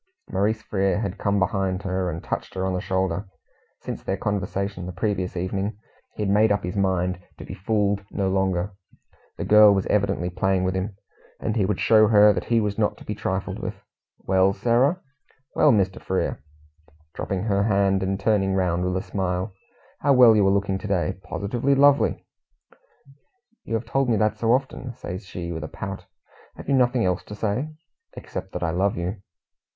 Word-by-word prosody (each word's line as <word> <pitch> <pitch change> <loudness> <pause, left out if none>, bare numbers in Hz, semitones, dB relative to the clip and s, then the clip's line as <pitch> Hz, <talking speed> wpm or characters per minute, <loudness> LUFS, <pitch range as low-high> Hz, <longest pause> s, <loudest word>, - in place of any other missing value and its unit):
Maurice 110 +3 0
Frere 100 -1 0
had 100 -2 -4
come 100 -1 +1
behind 95 -1 0
her 95 -1 -1
and 85 0 -5
touched - - -4
her 95 0 -1
on 95 - -1
the 90 - -2
shoulder. 95 0 -1 0.5
Since - - -6
their - - -2
conversation 100 -2 -3
the - - -4
previous 95 0 -2
evening, 95 +4 -2 0.4
he 105 - -3
had 100 - 0
made 105 +1 +4
up 100 0 +1
his 90 +2 -4
mind 90 -2 0 0.2
to - - -9
be - - -7
fooled 100 0 0
no 100 -2 -1
longer. 95 0 0 0.6
The - - -3
girl 105 -1 +7
was 95 - 0
evidently 100 -3 0
playing 95 +1 +1
with 95 0 0
him, 95 +1 -3 0.4
and 110 - -2
he 100 -5 +2
would 105 -2 -1
show 110 -1 +5
her 105 -1 +6
that - - -3
he 115 -1 +2
was 105 -1 -2
not 105 - +1
to - - -14
be - - -3
trifled - - -3
with. - - -4 0.4
"Well, 95 0 +2
Sarah!" 125 - +2 0.5
"Well, 150 - +5
Mr. 95 -4 +1
Frere," 95 -6 -2 0.7
dropping 95 -1 -3
her 100 -2 +1
hand, 100 -2 +2
and 95 +1 -1
turning 100 -2 +1
round 90 -2 +1
with 90 0 0
a 95 - -4
smile. 95 0 -2 0.5
"How 140 0 +3
well 125 -4 +7
you 100 -2 +4
are - - +4
looking 100 -1 0
to 105 - -6
day! 95 -1 -1
Positively 120 +7 -1
lovely!" 145 +1 +4 1.4
"You 115 - -2
have 115 - -2
told 135 +3 0
me 115 - +3
that 110 +1 +1
so 115 0 +1
often," 130 -1 -1
says 90 -1 -7
she, 85 -1 -6
with 80 -2 -5
a - - -4
pout. 95 +3 -7 0.5
"Have - - -11
you - - +1
nothing 125 -3 +3
else 90 +1 0
to 105 - -8
say?" 110 +8 -1 0.4
"Except - - -7
that - - -3
I 85 - 0
love 95 +3 0
you." 90 +4 -3
100 Hz, 190 wpm, -24 LUFS, 95-105 Hz, 1.4 s, girl